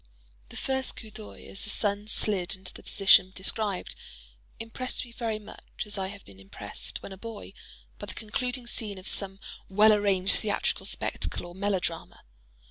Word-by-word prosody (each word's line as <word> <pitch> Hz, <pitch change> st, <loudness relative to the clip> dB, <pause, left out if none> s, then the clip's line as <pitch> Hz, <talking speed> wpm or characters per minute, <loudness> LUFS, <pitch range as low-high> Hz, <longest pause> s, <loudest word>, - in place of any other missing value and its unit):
The -, -, -8 dB
first 265 Hz, -1 st, +1 dB
coup 220 Hz, -, -7 dB
d'œil, 215 Hz, 0 st, -8 dB
as 195 Hz, -, -5 dB
the 215 Hz, -, -6 dB
sun 205 Hz, 0 st, 0 dB
slid 200 Hz, -5 st, +4 dB
into 185 Hz, -1 st, -7 dB
the -, -, -10 dB
position 195 Hz, -2 st, +6 dB
described, 200 Hz, 0 st, 0 dB, 0.7 s
impressed 255 Hz, +3 st, -2 dB
me 240 Hz, -, -12 dB
very 230 Hz, -2 st, -1 dB
much 210 Hz, -1 st, -7 dB
as 210 Hz, -, -8 dB
I 190 Hz, -2 st, -1 dB
have 200 Hz, 0 st, -8 dB
been 95 Hz, -1 st, -9 dB
impressed, 95 Hz, 0 st, -6 dB
when -, -, -6 dB
a 190 Hz, -, -7 dB
boy, 220 Hz, -, -7 dB, 0.5 s
by -, -, -5 dB
the -, -, -4 dB
concluding 250 Hz, +3 st, -1 dB
scene 215 Hz, -4 st, -1 dB
of 185 Hz, -, -6 dB
some 195 Hz, -1 st, -2 dB, 0.3 s
well 210 Hz, +3 st, +8 dB
arranged 200 Hz, -2 st, +3 dB
theatrical 210 Hz, -2 st, 0 dB
spectacle -, -, -1 dB
or 175 Hz, -, -8 dB
melodrama. 190 Hz, -3 st, -1 dB
205 Hz, 170 wpm, -29 LUFS, 190-220 Hz, 0.7 s, well